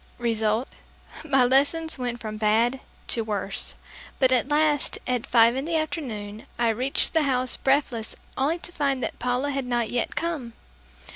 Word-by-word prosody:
Result 225 0 0 0.6
my 270 -5 +3
lessons 285 +4 +2
went 245 -1 -3
from 215 -2 -5
bad 225 +4 +2 0.3
to 230 - 0
worse, 200 -2 -3 0.4
but 260 -1 +3
at 255 0 +3
last 295 0 +2
at 250 -2 -1
five 235 0 +5
in 265 +2 -2
the 330 0 -1
afternoon, 225 -10 -4
I 235 0 +2
reached 255 +5 +2
the 320 - +4
house 255 -3 +1
breathless 265 -5 0 0.2
only 290 +6 +1
to 350 - -6
find 275 -5 -1
that - - -4
Paula 250 +3 0
had 275 -1 -2
not 240 -2 0
yet 245 - -1
come. 305 -9 -3
250 Hz, 160 wpm, -25 LUFS, 230-285 Hz, 0.6 s, five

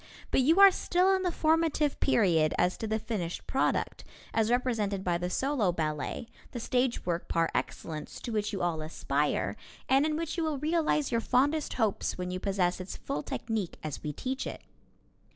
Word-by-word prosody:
But - - +4
you 320 +8 +4
are 395 -1 +10
still 365 +1 +2
in 380 - -1
the 360 -1 0
formative 315 -2 +1
period 170 - +3
as 180 +1 +2
to 220 - -4
the 220 0 0
finished 210 -6 -4
product, 265 - 0 0.3
as 225 -1 +2
represented 225 -6 0
by 175 -2 0
the 180 0 -2
solo 260 -3 +1
ballet, 155 +5 -3 0.3
the 240 - -3
stage 250 +1 0
work 175 -1 -2
par 165 0 +1
excellence, 155 -2 -4
to 240 - -5
which 210 -1 -1
you 195 -3 -3
all 165 -3 0
aspire, 150 -2 -1 0.3
and 270 +1 +4
in 305 0 0
which 330 +1 -3
you 335 - 0
will 310 -2 -1
realize 305 -1 +1
your 230 -1 +1
fondest 290 +6 +1
hopes 220 -5 0
when 180 0 -3
you 185 - -3
possess 185 -2 0
its 185 - -7
full 150 - -3
technique 215 +1 -3
as 155 -3 -5
we 150 - -3
teach 260 - -3
it. - - -7
225 Hz, 190 wpm, -30 LUFS, 180-290 Hz, 0.3 s, are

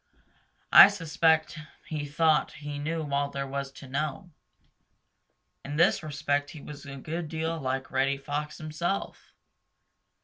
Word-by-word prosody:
I - - +12
suspect 160 -4 +1 0.3
he 150 -2 -4
thought 155 +1 +2
he 145 -1 -6
knew 160 +1 -3
all 140 0 +1
there 140 0 -4
was 135 0 -4
to 135 - -11
know. 150 +6 -3 1.3
In 145 +1 -5
this 165 - +4
respect 145 -2 -1
he 155 - -10
was 145 0 -10
a 140 - -7
good 160 +4 -5
deal 160 +1 -2
like 135 -1 -3
Reddy 135 +1 +1
Fox 145 +2 -4
himself. 165 +5 -4
150 Hz, 135 wpm, -28 LUFS, 140-160 Hz, 1.3 s, I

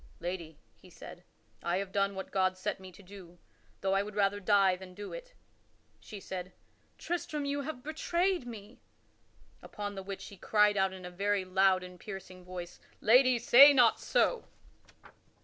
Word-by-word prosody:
"Lady," 170 -3 -6 0.2
he - - -19
said, - - -12 0.4
"I 175 +1 -1
have 195 0 -4
done 200 0 0
what 190 - -7
God 185 -1 +1
set 185 - -3
me 190 -1 -11
to 200 - -16
do, 180 -2 -13 0.4
though 195 0 0
I 195 - +3
would 205 0 -7
rather 205 0 +1
die 195 -2 +3
than 185 0 -12
do 205 +1 -8
it." - - -10 0.6
She 210 - -10
said, 185 -1 -7 0.4
"Tristram, 310 -4 -3
you 285 0 -2
have 275 -3 -7
betrayed 340 0 -1
me." 220 0 -10 0.8
Upon 205 -1 -6
the 195 - -6
which 195 0 -7
he 200 - -13
cried 210 +1 +3
out 190 -1 +1
in 185 -1 -10
a 180 - -7
very 200 +1 -1
loud 185 0 +3
and 180 0 -11
piercing 185 -2 -9
voice, 180 -1 -8 0.2
"Lady, 255 +2 +5
say 265 +5 +8
not 245 -4 +4
so!" - - +1
200 Hz, 170 wpm, -31 LUFS, 185-235 Hz, 0.8 s, say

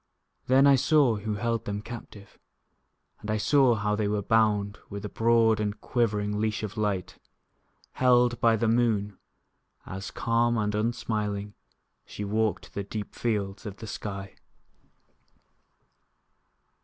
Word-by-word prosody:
Then 130 +2 +5
I 140 -1 +6
saw 135 -4 +3
who 105 +1 -3
held 115 +1 -2
them 105 0 -4
captive; 110 -3 -10 0.8
And 105 - -8
I 110 - +1
saw 125 +3 +4
how 105 0 0
they 105 -1 0
were 105 0 -1
bound 105 -2 +2
With 100 +1 -6
a - - -4
broad 115 -1 +3
and 105 0 -2
quivering 105 -4 -1
leash 110 -1 -1
of 105 0 -5
light, 105 -4 -2 0.7
Held 125 -2 +3
by 115 -1 +5
the 110 +1 0
moon, 110 -4 +1 0.7
As, 95 +1 -6
calm 115 0 +1
and 105 -1 0
unsmiling, 105 -2 -2 0.5
She 105 - -7
walked 105 -2 -1
the 100 - -3
deep 105 +1 -6
fields 105 -4 -2
of 100 -1 -7
the - - -8
sky. 100 -2 -6
105 Hz, 135 wpm, -27 LUFS, 105-115 Hz, 0.8 s, I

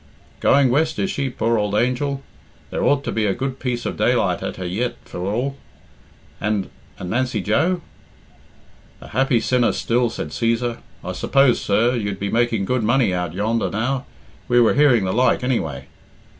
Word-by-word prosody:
"Going 135 -2 +4
west, 155 +4 +1
is 195 - 0
she, 135 -1 -1
poor 115 -2 0
ould 105 0 -1
angel? 135 +4 0 0.5
There - - -2
ought 140 -1 +2
to - - -3
be 110 -1 0
a 95 - 0
good 130 0 -3
piece 125 -2 -3
of - - -3
daylight - - +1
at - - -4
her 95 - -6
yet, 110 +8 -2
for - - -8
all. 120 +9 -2 0.8
And 105 -2 -1 0.3
and 90 - -6
Nancy 125 -1 0
Joe?" 160 - +1 1.2
"A - - -12
happy 130 0 +2
sinner 125 +1 +2
still," 120 +1 +1
said - - -5
Cæsar. 115 0 -1 0.2
"I - - -4
suppose, 135 -3 +3
sir, 110 +5 +2
you'd 100 -4 -2
be 100 0 -2
making 115 -4 +1
good 125 +3 0
money 120 -2 +2
out 90 -2 -2
yonder 110 +4 0
now? 125 +5 -2 0.4
We 120 0 +4
were 115 - +5
hearing 135 -7 +4
the 95 - -1
like, 125 +1 +2
anyway." 115 - -1
120 Hz, 175 wpm, -21 LUFS, 105-130 Hz, 1.2 s, were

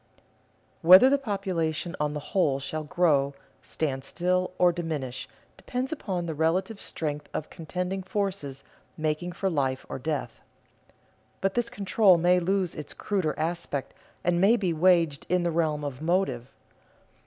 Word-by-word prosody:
_ - - -34 0.6
Whether 185 +10 +9
the 280 - +3
population 185 - -2
on 150 0 -1
the 150 +5 -7
whole 150 -9 +2
shall 155 +3 -4
grow, 145 -3 +2 0.3
stand 135 +1 -3
still, 180 +4 0
or 180 -1 +5
diminish, 155 -7 -4 0.3
depends 255 +1 -3
upon 190 - -3
the 165 - -3
relative 180 +7 0
strength 150 -2 -4
of 155 - -4
contending 180 +3 -4
forces 185 -8 -3 0.3
making 155 +3 -2
for 195 - -2
life 135 -7 -1
or - - -5
death. 140 -4 -3 1.0
But 195 0 0
this 240 -1 0
control 195 -2 +4
may 180 +2 +4
lose 185 0 0
its 150 -2 -8
cruder 185 -7 -1
aspect 160 -4 -3 0.3
and 175 0 +2
may 210 +5 +6
be 185 -6 0
waged 165 -3 +3
in 180 0 +2
the 170 - 0
realm 155 -3 0
of 140 -2 -5
motive. 160 -8 0
170 Hz, 150 wpm, -27 LUFS, 150-185 Hz, 1.0 s, Whether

